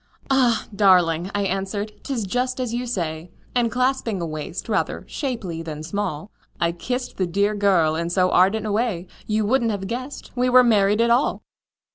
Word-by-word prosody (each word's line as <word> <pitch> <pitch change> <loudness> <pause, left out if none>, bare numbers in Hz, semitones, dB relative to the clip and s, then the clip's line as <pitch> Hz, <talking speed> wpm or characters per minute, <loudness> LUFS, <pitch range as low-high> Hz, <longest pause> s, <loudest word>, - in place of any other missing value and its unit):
"Ah! 245 -4 +3
darling," 180 -3 +4
I 205 - +1
answered, 195 +2 -2
"'tis 255 -6 -3
just 250 +6 -1
as 250 -3 -2
you 245 +1 -2
say;" 170 -6 -3 0.2
And 240 -2 +1
clasping 250 -5 0
a 170 - -2
waist 155 +2 -5
rather - - -1
shapely 225 - -4
than 155 -2 -6
small, 200 0 -4 0.3
I 170 0 +2
kissed 250 +9 -4
the 185 - 0
dear 200 +4 +1
girl 190 -7 +3
in 170 +1 -2
so 185 +1 +2
ardent 200 +4 +3
a 215 - -1
way 205 -5 0 0.2
You 215 0 +1
wouldn't 235 +1 +2
have 200 -3 -3
guessed 255 +7 -6
we 250 0 +2
were 250 0 +7
married 210 -2 +3
at 235 0 +3
all! 245 +4 +2
205 Hz, 180 wpm, -23 LUFS, 180-240 Hz, 0.3 s, were